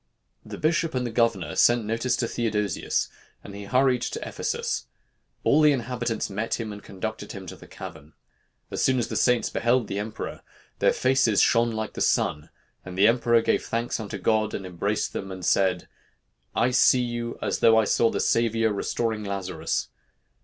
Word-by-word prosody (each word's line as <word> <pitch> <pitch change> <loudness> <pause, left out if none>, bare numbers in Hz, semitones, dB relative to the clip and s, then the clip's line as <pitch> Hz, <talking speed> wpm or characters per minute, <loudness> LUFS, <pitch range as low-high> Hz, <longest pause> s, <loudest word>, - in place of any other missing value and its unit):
The - - -8
bishop 160 -1 0
and 125 -1 0
the 120 - -3
governor 110 -8 0
sent 120 -2 +4
notice 115 +3 0
to 120 - -1
Theodosius, 105 -4 -1 0.4
and 100 - -10
he 100 0 -8
hurried 125 +2 +2
to - - -4
Ephesus. - - -3 0.6
All 150 - +4
the 150 -1 +6
inhabitants 120 -2 -2
met 105 +4 -2
him 110 -2 -4
and 105 - -10
conducted 105 +2 -6
him 95 -2 -8
to 90 - -8
the - - -15
cavern. 75 -1 -10 0.6
As - - -2
soon 130 -1 +3
as 120 - -1
the - - -4
saints 125 -1 +2
beheld 120 -1 +1
the 100 - -3
emperor, 110 +1 -6 0.4
their - - +4
faces 130 -5 +2
shone 120 0 +4
like 110 -1 -4
the - - -6
sun, 75 0 +1 0.3
and 90 0 -8
the 100 +2 +6
emperor 120 0 +3
gave - - +1
thanks 115 +1 -2
unto 110 -3 -5
God, 110 -1 +1
and 95 - -5
embraced 95 +4 -2
them, 95 -1 -5
and 95 -2 -6
said, 95 -2 +2 0.7
'I 120 +2 +2
see 125 0 +5
you, 120 -1 -4
as - - -2
though 115 0 +6
I 110 - +5
saw 115 +2 +3
the - - -2
Savior 115 -1 +2
restoring 110 +1 -2
Lazarus.' 100 -2 -3
115 Hz, 180 wpm, -25 LUFS, 100-120 Hz, 0.7 s, the